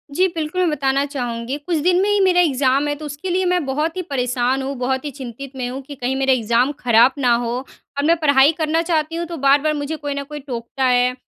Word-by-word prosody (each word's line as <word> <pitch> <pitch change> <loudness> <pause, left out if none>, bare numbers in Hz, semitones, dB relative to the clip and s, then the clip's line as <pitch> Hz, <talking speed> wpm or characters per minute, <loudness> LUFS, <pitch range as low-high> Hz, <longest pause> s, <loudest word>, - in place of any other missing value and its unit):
जी, 370 +1 +4
बिल्कुल। 320 +3 -2
मैं 350 - +2
बताना 275 -1 +1
चाहूँगी, 245 -1 -4
कुछ 320 +3 -2
दिन 355 +4 +2
में 410 - +1
ही 415 0 +2
मेरा 370 -2 +4
एग्ज़ाम 275 -2 +2
है, 290 - 0
तो 305 +1 -9
उसके 295 +6 -6
लिए 370 +1 +1
मैं 360 -2 +1
बहुत 305 +6 -2
ही 370 - -1
परेशान 255 -3 -1
हूँ, 275 +1 -3
बहुत 260 +2 -1
ही 290 - -3
चिंतित 265 0 -8
में 250 -1 -3
हूँ, 265 +2 -6
कि 285 +1 -10
कहीं 255 +1 -2
मेरे 265 0 +2
एग्ज़ाम 240 +3 +1
खराब 240 +1 +5
ना 245 -3 +3
हो। 235 - -2 0.5
और 285 - 0
मैं 335 +1 +5
पढ़ाई 285 0 +5
करना 320 +1 +1
चाहती 325 -1 -1
हूँ, 340 - -2
तो 340 -1 -6
बार-बार 285 +3 +3
मुझे 295 +2 -3
कोई 290 -2 -4
न 280 0 -4
कोई 295 +1 -8
टोकता 260 -1 -5
है, 250 0 +3
280 Hz, 245 wpm, -20 LUFS, 255-315 Hz, 0.5 s, खराब